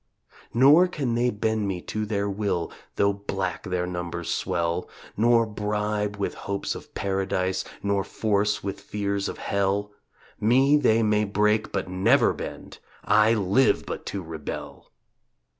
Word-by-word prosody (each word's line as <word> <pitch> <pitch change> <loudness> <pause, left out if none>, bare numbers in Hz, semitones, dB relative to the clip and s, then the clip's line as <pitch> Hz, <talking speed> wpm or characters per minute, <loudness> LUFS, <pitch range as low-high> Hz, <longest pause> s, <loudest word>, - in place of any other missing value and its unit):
Nor 145 +9 +6
can 140 -9 -2
they 120 +1 +2
bend 110 -1 -1
me 95 -2 -2
to 110 +3 -4
their 100 -1 -1
will 100 -4 -2 0.2
Though 100 0 +3
black 95 -2 -3
their 90 -2 -2
numbers 85 -1 -3
swell, 85 0 -1 0.3
Nor 115 +1 +4
bribe 105 -1 -2
with 100 - -2
hopes 100 0 -3
of - - -11
paradise 95 -1 -1 0.2
Nor 100 -1 +1
force 105 +1 0
with 100 0 -4
fears 100 -1 -2
of - - -6
hell; 100 +1 -1 0.5
Me 130 +6 +4
they 115 -6 +3
may 105 0 +2
break 105 +1 +1
but 95 -1 -2
never 110 +9 +3
bend, - - -8 0.3
I 110 +2 +5
live 100 +5 +2
but - - -6
to 100 -2 -4
rebel! 80 -3 -7
100 Hz, 140 wpm, -25 LUFS, 95-110 Hz, 0.5 s, Nor